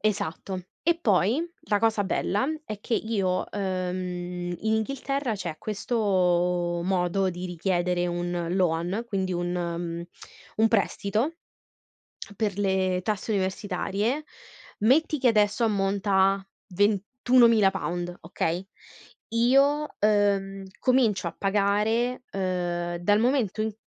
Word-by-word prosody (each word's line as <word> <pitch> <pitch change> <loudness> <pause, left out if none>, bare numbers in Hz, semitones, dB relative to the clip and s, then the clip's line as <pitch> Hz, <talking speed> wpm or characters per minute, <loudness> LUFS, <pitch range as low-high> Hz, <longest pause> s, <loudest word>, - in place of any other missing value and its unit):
Esatto. 200 -2 -2 0.2
E 335 +1 +3
poi, 210 - +3 0.3
la 205 - +3
cosa 220 -1 +2
bella, 200 +2 0 0.2
è 215 -7 -6
che 235 - -1
io 200 -5 0
ehm, 180 -2 -3
in 220 +3 0
Inghilterra, 275 +2 -1
c'è 170 -6 -5
questo, 180 -5 +1
modo, 185 +1 +1
di 180 +1 -5
richiedere 175 0 0
un 175 -1 -2
loan, 180 +3 0
quindi, 190 -4 -2
un 175 0 -2
mhmm, 170 -1 -3 0.5
un 220 +1 +4
prestito, 220 +6 0 1.0
per 205 -3 -1
le 190 -2 +1
tasse 215 +2 -2
universitarie. 200 +7 -1 0.6
Metti 290 +7 +3
che, 255 - +3
adesso, 210 0 +3
ammonta 200 -1 0 0.2
a, 195 -1 -9 0.2
£21.000, 205 -3 +2
okay? 170 +2 -2 0.6
Io, 275 +6 +3
uhm, 200 -2 +2
comincio 230 -9 +2
a 170 - -10
pagare, 210 +5 +1
ehm, 175 -2 -2
dal 205 +4 +3
momento 235 -4 +1
in 220 - -2
195 Hz, 110 wpm, -26 LUFS, 180-220 Hz, 1.0 s, un